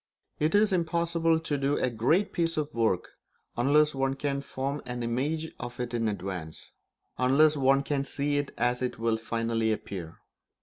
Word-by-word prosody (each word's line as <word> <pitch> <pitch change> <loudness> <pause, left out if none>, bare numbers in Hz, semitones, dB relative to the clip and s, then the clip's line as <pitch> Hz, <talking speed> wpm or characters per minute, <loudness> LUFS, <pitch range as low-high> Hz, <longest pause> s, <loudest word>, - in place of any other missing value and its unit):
It 155 +5 +2
is 210 -1 +4
impossible 165 -1 +1
to 150 -3 -2
do 140 +1 +1
a 125 - 0
great 135 - +1
piece 165 -1 0
of 150 -1 -2
work 110 -6 +1 0.5
unless 150 +5 +4
one 135 0 0
can 140 0 -2
form 140 +1 -3
an 125 -1 -4
image 145 +7 -2
of 120 0 -7
it 125 -1 -3
in 115 -1 0
advance, 90 -6 -5 0.5
unless 145 +5 +5
one 135 0 +3
can 140 -1 -1
see 145 +1 -1
it 145 - -3
as 125 +1 +1
it 125 - -2
will 115 0 +1
finally 115 0 -1
appear. 90 -6 -5
135 Hz, 170 wpm, -28 LUFS, 115-150 Hz, 0.5 s, unless